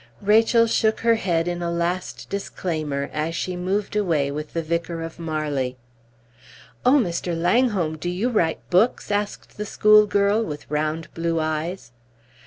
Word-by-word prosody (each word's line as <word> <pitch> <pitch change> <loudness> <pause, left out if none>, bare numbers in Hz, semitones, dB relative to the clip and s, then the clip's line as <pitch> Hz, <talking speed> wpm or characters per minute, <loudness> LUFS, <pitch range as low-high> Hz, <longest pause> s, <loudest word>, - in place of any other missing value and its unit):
Rachel 225 +3 +5
shook 220 -1 +1
her 230 0 +4
head 175 -6 0
in 175 0 -2
a 170 - -1
last 170 +2 -2
disclaimer 155 -8 -3
as 155 +2 -2
she 180 +1 -2
moved 190 +4 -2
away 160 -9 +1
with 150 +1 -6
the 165 - -1
Vicar 170 +1 -2
of 165 +1 -8
Marley. 150 -6 -2 1.1
"Oh, 255 +4 +5
Mr. 175 -6 -1
Langholm, 180 -4 +2
do 175 - -3
you 185 +7 -1
write 170 -9 0
books?" 210 +5 +2
asked 205 0 -3
the 210 - -2
schoolgirl, 210 0 +4
with 150 -6 -6
round 155 +2 -2
blue 165 0 -1
eyes. 155 -2 -3
175 Hz, 150 wpm, -23 LUFS, 160-205 Hz, 1.1 s, Rachel